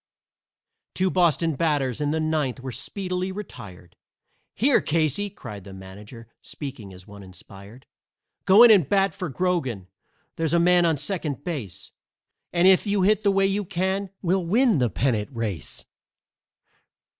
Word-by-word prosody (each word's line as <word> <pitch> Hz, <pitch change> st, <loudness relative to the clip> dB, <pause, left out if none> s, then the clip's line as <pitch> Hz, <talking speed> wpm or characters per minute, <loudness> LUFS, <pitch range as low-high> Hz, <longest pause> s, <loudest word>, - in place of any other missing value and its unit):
Two 185 Hz, 0 st, +1 dB
Boston 165 Hz, -2 st, +2 dB
batters 145 Hz, -4 st, -1 dB
in 145 Hz, -, 0 dB
the 160 Hz, +2 st, -1 dB
ninth 155 Hz, -5 st, -1 dB
were 130 Hz, 0 st, -6 dB
speedily 185 Hz, -, -4 dB
retired, 105 Hz, -, -10 dB, 0.6 s
"Here, 270 Hz, +4 st, +3 dB
Casey!" 160 Hz, +5 st, 0 dB
cried 105 Hz, -, -10 dB
the 100 Hz, 0 st, -11 dB
manager, 105 Hz, +5 st, -12 dB
speaking 135 Hz, -9 st, -8 dB
as 90 Hz, 0 st, -13 dB
one 105 Hz, -1 st, -13 dB
inspired, 100 Hz, +5 st, -14 dB, 0.6 s
"Go 200 Hz, +5 st, +7 dB
in 240 Hz, -, +8 dB
and 185 Hz, -10 st, +4 dB
bat 195 Hz, -1 st, +2 dB
for 185 Hz, -4 st, -5 dB
Grogan! 135 Hz, -, -2 dB, 0.5 s
There's 165 Hz, 0 st, 0 dB
a -, -, +4 dB
man 175 Hz, 0 st, +4 dB
on 160 Hz, -3 st, +1 dB
second 150 Hz, -2 st, -4 dB
base, 105 Hz, -, -6 dB, 0.6 s
And 175 Hz, +1 st, +3 dB
if 190 Hz, +2 st, +4 dB
you 200 Hz, -2 st, +1 dB
hit 210 Hz, +2 st, +3 dB
the 205 Hz, -, +3 dB
way 195 Hz, 0 st, +2 dB
you 200 Hz, +1 st, 0 dB
can 190 Hz, +1 st, -2 dB
we'll 185 Hz, +1 st, +1 dB
win 220 Hz, -, +2 dB
the 125 Hz, -2 st, +1 dB
pennant 110 Hz, -2 st, -1 dB
race." 110 Hz, -7 st, -5 dB
160 Hz, 150 wpm, -24 LUFS, 115-190 Hz, 0.6 s, in